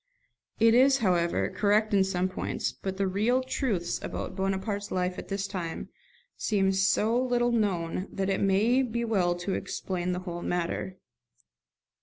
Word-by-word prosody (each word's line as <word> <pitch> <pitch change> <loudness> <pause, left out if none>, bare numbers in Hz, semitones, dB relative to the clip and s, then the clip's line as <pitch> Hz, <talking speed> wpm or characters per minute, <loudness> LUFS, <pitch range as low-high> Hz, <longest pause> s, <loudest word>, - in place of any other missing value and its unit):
It 225 0 +6
is, 265 +3 +6
however, 180 -7 +1
correct 210 +3 +2
in 195 -1 +5
some 185 -1 0
points; 185 - -3
but 190 -1 -6
the 200 - +1
real 215 +7 +1
truths 225 -9 -1
about - - -5
Bonaparte's 195 +1 -2
life 180 0 -1
at - - -8
this 195 0 -2
time 175 -5 -5 0.5
seem 195 -3 +1
so 195 +4 +2
little 240 -1 +1
known 190 -5 0
that 195 -1 -2
it 195 -1 0
may 210 +7 +3
be 235 -2 -2
well 185 -6 +1
to 175 +2 -3
explain 180 -1 -3
the 180 0 -2
whole 175 -2 -6
matter. 175 +2 -2
195 Hz, 155 wpm, -28 LUFS, 185-220 Hz, 0.5 s, It